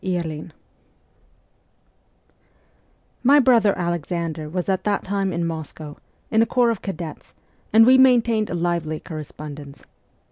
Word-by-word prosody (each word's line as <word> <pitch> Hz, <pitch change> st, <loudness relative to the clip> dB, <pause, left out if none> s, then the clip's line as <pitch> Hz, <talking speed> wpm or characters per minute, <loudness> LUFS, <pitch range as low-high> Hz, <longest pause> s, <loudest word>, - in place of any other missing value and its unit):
Ill 170 Hz, -4 st, -3 dB, 2.7 s
MY 280 Hz, +4 st, +5 dB
brother 235 Hz, -6 st, +4 dB
Alexander 170 Hz, -2 st, -3 dB
was 180 Hz, +2 st, -3 dB
at 190 Hz, -1 st, 0 dB
that 205 Hz, -1 st, 0 dB
time 195 Hz, 0 st, -1 dB
at 170 Hz, 0 st, -2 dB
Moscow, 160 Hz, -2 st, -5 dB, 0.4 s
in 220 Hz, -, +4 dB
a 225 Hz, -, +2 dB
corps 245 Hz, -2 st, +2 dB
of 225 Hz, -, -4 dB
cadets, 170 Hz, -4 st, -7 dB, 0.4 s
and 225 Hz, +1 st, +7 dB
we 260 Hz, +2 st, +6 dB
maintained 235 Hz, -4 st, +4 dB
a -, -, -3 dB
lively 170 Hz, -2 st, -2 dB
corre 155 Hz, -3 st, -7 dB
spondence. 145 Hz, -1 st, -10 dB
175 Hz, 130 wpm, -22 LUFS, 160-220 Hz, 2.7 s, and